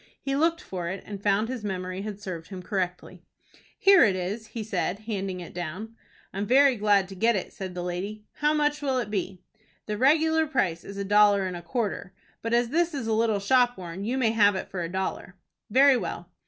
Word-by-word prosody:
He 275 Hz, 0 st, -2 dB
looked 330 Hz, +3 st, +1 dB
for 180 Hz, -3 st, -5 dB
it, 190 Hz, +1 st, -5 dB
and 200 Hz, -2 st, -7 dB
found 205 Hz, +2 st, +2 dB
his 250 Hz, -3 st, -5 dB
memory 185 Hz, -1 st, -4 dB
had 205 Hz, -1 st, -6 dB
served 180 Hz, -5 st, -6 dB
him 185 Hz, -2 st, -8 dB
correctly. 180 Hz, -2 st, -3 dB, 0.6 s
"Here 390 Hz, -5 st, +7 dB
it 205 Hz, -5 st, +3 dB
is," 200 Hz, +5 st, -4 dB
he 225 Hz, 0 st, -6 dB
said, 200 Hz, -1 st, -2 dB
handing 195 Hz, -4 st, -4 dB
it 175 Hz, -, -10 dB
down. 180 Hz, +7 st, -6 dB, 0.4 s
"I 195 Hz, -, -4 dB
am 205 Hz, -, -2 dB
very 270 Hz, +2 st, +5 dB
glad 205 Hz, -3 st, +3 dB
to 195 Hz, -, -9 dB
get 230 Hz, +4 st, +2 dB
it," 190 Hz, -, -4 dB
said 185 Hz, -2 st, -7 dB
the 175 Hz, -, -4 dB
lady. 195 Hz, +5 st, -5 dB
"How 300 Hz, 0 st, +2 dB
much 295 Hz, -1 st, +1 dB
will 270 Hz, -3 st, 0 dB
it 235 Hz, -5 st, -2 dB
be?" 190 Hz, -2 st, -3 dB, 0.4 s
"The 210 Hz, -1 st, -4 dB
regular 320 Hz, +3 st, +3 dB
price 185 Hz, -, 0 dB
is 200 Hz, -, -9 dB
a 200 Hz, -, -3 dB
dollar 205 Hz, -1 st, +4 dB
and 185 Hz, -1 st, -4 dB
a 175 Hz, -, -6 dB
quarter, 205 Hz, -3 st, -3 dB, 0.3 s
but 230 Hz, -, -3 dB
as 240 Hz, 0 st, +2 dB
this 335 Hz, +3 st, +1 dB
is 265 Hz, -5 st, -3 dB
a 225 Hz, -, 0 dB
little 220 Hz, -2 st, +2 dB
shop 245 Hz, +4 st, +3 dB
worn 180 Hz, +1 st, -7 dB
you 240 Hz, +5 st, -1 dB
may 235 Hz, -4 st, +2 dB
have 205 Hz, -3 st, +4 dB
it 190 Hz, -, -4 dB
for 185 Hz, -, -3 dB
a 165 Hz, -, -3 dB
dollar." 190 Hz, 0 st, -4 dB, 0.3 s
"Very 270 Hz, +3 st, +6 dB
well." 175 Hz, -6 st, -5 dB
205 Hz, 220 wpm, -26 LUFS, 185-245 Hz, 0.6 s, Here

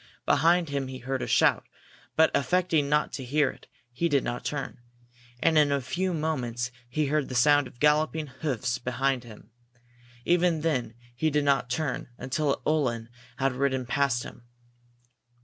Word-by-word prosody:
Behind 170 Hz, 0 st, +3 dB
him 140 Hz, -2 st, -2 dB
he 130 Hz, 0 st, -6 dB
heard 130 Hz, +1 st, -3 dB
a -, -, -3 dB
shout, -, -, +3 dB, 0.5 s
but, 160 Hz, 0 st, +5 dB
affecting 165 Hz, -2 st, +1 dB
not 150 Hz, +1 st, +1 dB
to 135 Hz, -, -5 dB
hear 140 Hz, +2 st, +1 dB
it, -, -, -18 dB, 0.2 s
he 170 Hz, +8 st, -1 dB
did 140 Hz, -3 st, +2 dB
not 120 Hz, 0 st, -4 dB
turn. 140 Hz, -3 st, -4 dB, 0.6 s
And 160 Hz, -2 st, +5 dB
in 145 Hz, -1 st, +4 dB
a 140 Hz, -, +2 dB
few 180 Hz, +9 st, -2 dB
moments 125 Hz, -7 st, -2 dB, 0.2 s
he 150 Hz, +5 st, 0 dB
heard 150 Hz, 0 st, 0 dB
the 130 Hz, -, -5 dB
sound 145 Hz, +2 st, +4 dB
of 120 Hz, -, -17 dB
galloping 155 Hz, +2 st, +2 dB
hoofs 130 Hz, -3 st, -3 dB
behind 130 Hz, +1 st, -1 dB
him. 110 Hz, -1 st, -14 dB, 0.7 s
Even 175 Hz, -2 st, +2 dB
then 125 Hz, -8 st, -1 dB, 0.2 s
he 155 Hz, +6 st, +1 dB
did 150 Hz, -1 st, +1 dB
not 135 Hz, -3 st, +2 dB
turn 130 Hz, +1 st, -2 dB
until 135 Hz, +3 st, -1 dB
a -, -, -5 dB
Uhlan 120 Hz, -7 st, 0 dB, 0.3 s
had 135 Hz, 0 st, +1 dB
ridden 130 Hz, -1 st, 0 dB
past 125 Hz, -1 st, +1 dB
him. 120 Hz, -, -12 dB
140 Hz, 165 wpm, -27 LUFS, 125-155 Hz, 0.7 s, but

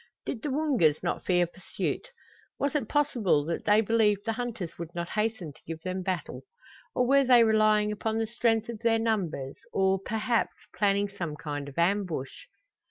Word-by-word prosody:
Did 230 Hz, -, -4 dB
the 295 Hz, -, -3 dB
Woongas 260 Hz, -, +2 dB
not 175 Hz, -, -2 dB
fear 175 Hz, -1 st, +3 dB
pursuit? 185 Hz, -, -4 dB, 0.5 s
Was 280 Hz, -1 st, 0 dB
it 295 Hz, -, -1 dB
possible 235 Hz, -, +2 dB
that 165 Hz, +1 st, -3 dB
they 210 Hz, +1 st, +5 dB
believed 210 Hz, -2 st, +2 dB
the 225 Hz, -, 0 dB
hunters 220 Hz, -9 st, -5 dB
would 170 Hz, +1 st, -7 dB
not 170 Hz, 0 st, -3 dB
hasten 215 Hz, -7 st, -2 dB
to -, -, -21 dB
give 165 Hz, 0 st, -6 dB
them 185 Hz, 0 st, -3 dB
battle? 185 Hz, -1 st, -3 dB, 0.5 s
Or 250 Hz, -, +3 dB
were 275 Hz, +2 st, +5 dB
they 245 Hz, -2 st, +6 dB
relying 215 Hz, -1 st, +3 dB
upon 220 Hz, +1 st, -2 dB
the 225 Hz, -, +1 dB
strength 225 Hz, -1 st, +1 dB
of 235 Hz, -2 st, -6 dB
their 230 Hz, 0 st, +3 dB
numbers, 185 Hz, -12 st, -1 dB
or, 190 Hz, 0 st, +2 dB
perhaps, 225 Hz, +2 st, 0 dB, 0.2 s
planning 200 Hz, 0 st, +2 dB
some 175 Hz, -6 st, -5 dB
kind 145 Hz, -2 st, -5 dB
of 140 Hz, -, -15 dB
ambush? 175 Hz, -, -1 dB
210 Hz, 175 wpm, -28 LUFS, 175-230 Hz, 0.5 s, they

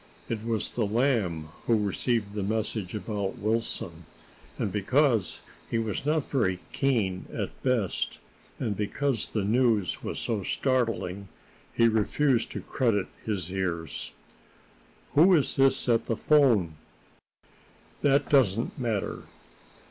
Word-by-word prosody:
It 110 Hz, -2 st, -3 dB
was 115 Hz, -2 st, -1 dB
the 115 Hz, -4 st, 0 dB
Lamb 105 Hz, -, 0 dB, 0.2 s
who 115 Hz, -, +4 dB
received 105 Hz, +1 st, -1 dB
the 105 Hz, -, -2 dB
message 110 Hz, -1 st, -2 dB
about 100 Hz, -1 st, -3 dB
Wilson; 100 Hz, -6 st, -2 dB, 0.5 s
and 100 Hz, -, -1 dB
because 115 Hz, -, +1 dB, 0.3 s
he 115 Hz, -, 0 dB
was 115 Hz, +4 st, -2 dB
not 155 Hz, -1 st, +1 dB
very 100 Hz, -9 st, +1 dB
keen 110 Hz, -9 st, 0 dB
at -, -, -3 dB
the 130 Hz, -, 0 dB
best, 95 Hz, -, -3 dB, 0.4 s
and 110 Hz, -5 st, -2 dB
because 115 Hz, +4 st, -1 dB
the 105 Hz, -, -1 dB
news 110 Hz, -3 st, +2 dB
was -, -, -4 dB
so 110 Hz, -4 st, -2 dB
startling, 110 Hz, -5 st, -1 dB, 0.4 s
he 115 Hz, -, +4 dB
refused 115 Hz, +4 st, +2 dB
to -, -, -4 dB
credit 110 Hz, -7 st, 0 dB
his 95 Hz, -5 st, -3 dB
ears. 85 Hz, -5 st, -3 dB, 1.0 s
"Who 175 Hz, +5 st, +6 dB
is 150 Hz, -, +2 dB
this 135 Hz, 0 st, +3 dB
at 115 Hz, -2 st, +2 dB
the 115 Hz, -, 0 dB
'phone?" 115 Hz, -, +3 dB, 1.2 s
"That 140 Hz, -1 st, +3 dB
doesn't 120 Hz, -5 st, +2 dB
matter. 115 Hz, -5 st, -2 dB
110 Hz, 125 wpm, -28 LUFS, 100-125 Hz, 1.2 s, Who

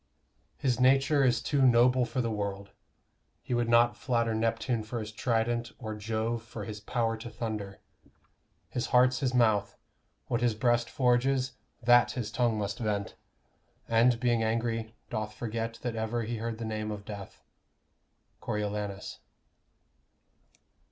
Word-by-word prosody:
His 125 Hz, -3 st, 0 dB
nature 135 Hz, +3 st, +4 dB
is 120 Hz, -2 st, +2 dB
too 140 Hz, +2 st, +1 dB
noble 125 Hz, 0 st, +5 dB
for 120 Hz, +2 st, -2 dB
the 115 Hz, -2 st, -1 dB
world: 100 Hz, -1 st, -4 dB, 0.7 s
He -, -, -3 dB
would 120 Hz, -1 st, +1 dB
not 120 Hz, -1 st, +5 dB
flatter 115 Hz, -1 st, 0 dB
Neptune 115 Hz, +1 st, 0 dB
for 115 Hz, +2 st, -5 dB
his 110 Hz, -1 st, -5 dB
trident, 120 Hz, +1 st, -1 dB
Or 110 Hz, -4 st, -5 dB
Jove 110 Hz, +2 st, -2 dB
for 110 Hz, -2 st, -8 dB
his 105 Hz, +1 st, -6 dB
power 115 Hz, +1 st, -1 dB
to 115 Hz, +1 st, -8 dB
thunder. 105 Hz, -4 st, -5 dB, 0.9 s
His 125 Hz, -, -2 dB
heart's 125 Hz, +1 st, +4 dB
his 130 Hz, -2 st, 0 dB
mouth; 110 Hz, -4 st, +2 dB, 0.5 s
What 120 Hz, -, -1 dB
his 120 Hz, -2 st, +2 dB
breast 120 Hz, 0 st, +2 dB
forges, 130 Hz, 0 st, +2 dB, 0.3 s
that 120 Hz, +1 st, +5 dB
his 115 Hz, -4 st, -4 dB
tongue 120 Hz, -2 st, +1 dB
must 100 Hz, -1 st, -3 dB
vent; 105 Hz, -3 st, -2 dB, 0.7 s
And, 115 Hz, +1 st, +4 dB
being 120 Hz, -2 st, +2 dB
angry, 115 Hz, 0 st, -1 dB, 0.2 s
doth 110 Hz, -2 st, -3 dB
forget 115 Hz, 0 st, -3 dB
that 120 Hz, -2 st, -2 dB
ever 110 Hz, +1 st, -1 dB
He 115 Hz, +1 st, -3 dB
heard 115 Hz, 0 st, -4 dB
the 115 Hz, -, -5 dB
name 110 Hz, -1 st, -3 dB
of 105 Hz, -1 st, -6 dB
death. 100 Hz, -2 st, -9 dB, 1.0 s
_Coriolanus. 105 Hz, -1 st, -3 dB
115 Hz, 145 wpm, -29 LUFS, 110-120 Hz, 1.0 s, noble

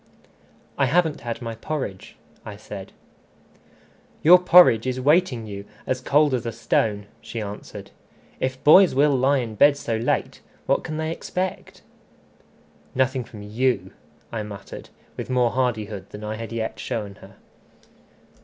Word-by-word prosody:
"I 135 Hz, -, +3 dB
haven't 160 Hz, +2 st, +1 dB
had 120 Hz, +1 st, -5 dB
my 115 Hz, -1 st, -4 dB
porridge," 115 Hz, -5 st, -5 dB, 0.3 s
I 105 Hz, -, -8 dB
said. 100 Hz, -2 st, -9 dB, 1.3 s
"Your 180 Hz, +3 st, +8 dB
porridge 175 Hz, -10 st, +6 dB
is 130 Hz, 0 st, -2 dB
waiting 140 Hz, -4 st, +2 dB
you 100 Hz, -1 st, -7 dB, 0.2 s
as 130 Hz, 0 st, -2 dB
cold 145 Hz, +2 st, +3 dB
as 125 Hz, -3 st, 0 dB
a -, -, -2 dB
stone," 110 Hz, -2 st, 0 dB, 0.2 s
she 115 Hz, -, -6 dB
answered. 105 Hz, -1 st, -8 dB, 0.5 s
"If 130 Hz, +1 st, -3 dB
boys 180 Hz, +1 st, +7 dB
will 145 Hz, +2 st, +4 dB
lie 135 Hz, +2 st, +3 dB
in 120 Hz, -4 st, -3 dB
bed 140 Hz, +6 st, +5 dB
so 115 Hz, -5 st, -2 dB
late, 115 Hz, +2 st, -1 dB, 0.2 s
what -, -, +1 dB
can 155 Hz, -1 st, -5 dB
they 160 Hz, 0 st, -2 dB
expect?" 185 Hz, +2 st, -5 dB, 1.1 s
"Nothing 130 Hz, 0 st, +1 dB
from 105 Hz, -3 st, -11 dB
you," 120 Hz, +5 st, -1 dB, 0.4 s
I 115 Hz, -, -3 dB
muttered, 100 Hz, -2 st, -9 dB, 0.3 s
with -, -, -6 dB
more 125 Hz, -2 st, +2 dB
hardihood 110 Hz, -6 st, -2 dB
than 105 Hz, -, -10 dB
I 105 Hz, 0 st, -3 dB
had 115 Hz, +1 st, -7 dB
yet 115 Hz, -1 st, -4 dB
shown 110 Hz, -5 st, -4 dB
her. -, -, -14 dB
125 Hz, 145 wpm, -23 LUFS, 110-145 Hz, 1.3 s, Your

